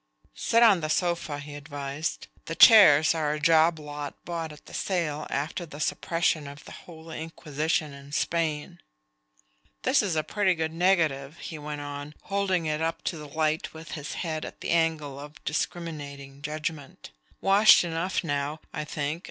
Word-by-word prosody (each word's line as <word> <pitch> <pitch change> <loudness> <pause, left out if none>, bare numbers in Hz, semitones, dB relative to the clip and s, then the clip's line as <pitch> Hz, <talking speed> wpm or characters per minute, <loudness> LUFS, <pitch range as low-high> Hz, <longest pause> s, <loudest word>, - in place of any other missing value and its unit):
"Sit 230 - +3
on 210 -6 +6
the 155 - -2
sofa," 170 -3 0
he 145 0 -8
advised. 145 +1 -4 0.2
"The 165 - -4
chairs 165 -11 +8
are 155 -2 0
a - - -5
job 160 +1 +4
lot 145 -1 -6
bought 165 -2 -4
at 150 - -14
the - - -13
sale 160 -6 -1
after 150 +5 -2
the 150 -3 -10
suppression 165 -1 0
of 140 +1 -11
the - - -11
Holy 160 -2 -9
Inquisition 155 -1 -2
in 140 0 -12
Spain. 155 -1 -1 1.0
This - - +4
is 190 -6 -1
a 155 - +1
pretty 190 +3 +1
good 160 -1 -2
negative," 165 -5 +1
he 160 -2 -7
went 150 0 -5
on, 145 +1 -7
holding 195 -3 0
it 155 0 -1
up 165 +1 -2
to 170 - -2
the 150 - -8
light 155 +1 -1
with 160 +1 -10
his 145 -3 -5
head 160 -3 -3
at - - -9
the - - -2
angle 160 -4 0
of 150 +1 -11
discriminating 145 -4 -4
judgment. 150 - -5 0.3
"Washed 200 +1 +7
enough 170 +3 -1
now, 145 0 -2
I 150 - -3
think. 150 +1 -3
155 Hz, 170 wpm, -27 LUFS, 145-165 Hz, 1.0 s, chairs